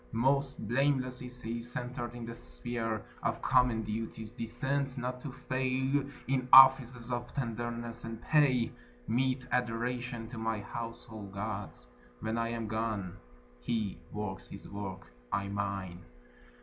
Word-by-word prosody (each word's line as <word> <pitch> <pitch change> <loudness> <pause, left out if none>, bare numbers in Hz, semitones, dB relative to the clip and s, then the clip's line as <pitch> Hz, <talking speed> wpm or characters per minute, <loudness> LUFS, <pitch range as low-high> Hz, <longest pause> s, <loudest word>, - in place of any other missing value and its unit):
Most 135 0 +2
blameless 130 +1 +2
is 125 0 -8
he, 115 +1 -2
centred 120 0 -3
in 120 -1 -5
the 115 - -5
sphere 115 -2 -3 0.2
Of - - 0
common 125 -3 +4
duties, 110 +1 -4
decent 130 +3 -1
not 125 0 -3
to 140 - -5
fail 130 +2 0 0.2
In 130 -1 +1
offices 125 -2 +9
of 120 0 -2
tenderness, 120 -2 -3
and 115 -1 -5
pay 135 -6 +4 0.4
Meet 130 +2 +1
adoration 120 0 -1
to 120 -2 -6
my 110 -1 0
household 110 -2 -6
gods, 100 - -4 0.3
When 110 - -1
I 115 - +1
am 115 -1 -2
gone. 110 -4 -1 0.4
He 105 - -1
works 105 -3 -4
his - - -8
work, 95 -2 -5 0.3
I 100 0 0
mine. 100 -3 -3
120 Hz, 135 wpm, -32 LUFS, 110-125 Hz, 0.4 s, offices